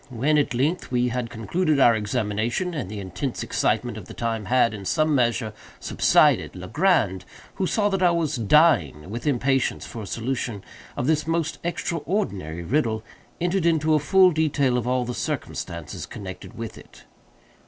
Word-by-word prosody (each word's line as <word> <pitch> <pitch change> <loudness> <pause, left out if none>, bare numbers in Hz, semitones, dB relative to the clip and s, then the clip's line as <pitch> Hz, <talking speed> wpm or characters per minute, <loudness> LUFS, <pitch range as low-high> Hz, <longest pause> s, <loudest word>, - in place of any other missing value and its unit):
When, 140 +5 +2
at 140 -4 0
length, 150 +9 0
we 125 0 +1
had 120 -1 -3
concluded 155 - 0
our 120 -3 +6
examination, 110 - -1
and 135 - -4
the 105 0 -6
intense 100 +7 -4
excitement 120 -3 0
of 95 - -11
the - - -11
time 115 -3 -2
had, 120 +1 +3
in 100 -2 -7
some 155 - +1
measure, 120 -4 +1 0.3
subsided, - - +3
Legrand, 95 - +1 0.3
who 190 - 0
saw 205 +1 +1
that 195 -2 -1
I 180 - +5
was 165 -3 0
dying 110 - +3
with 120 +5 -5
impatience 135 -1 +1
for 115 - -7
a 100 - -7
solution 115 -2 -3 0.3
of 125 - -1
this 155 0 +1
most 165 -1 -1
extraordinary 165 - -2
riddle, 110 - 0 0.4
entered 175 0 +1
into 160 -1 +2
a 155 - +4
full 185 +6 +5
detail 145 -5 +1
of 125 -1 -1
all 125 0 +1
the 125 - -4
circumstances 85 -8 -5
connected 95 -2 -9
with 115 -1 -6
it. - - -17
125 Hz, 165 wpm, -24 LUFS, 110-155 Hz, 0.4 s, our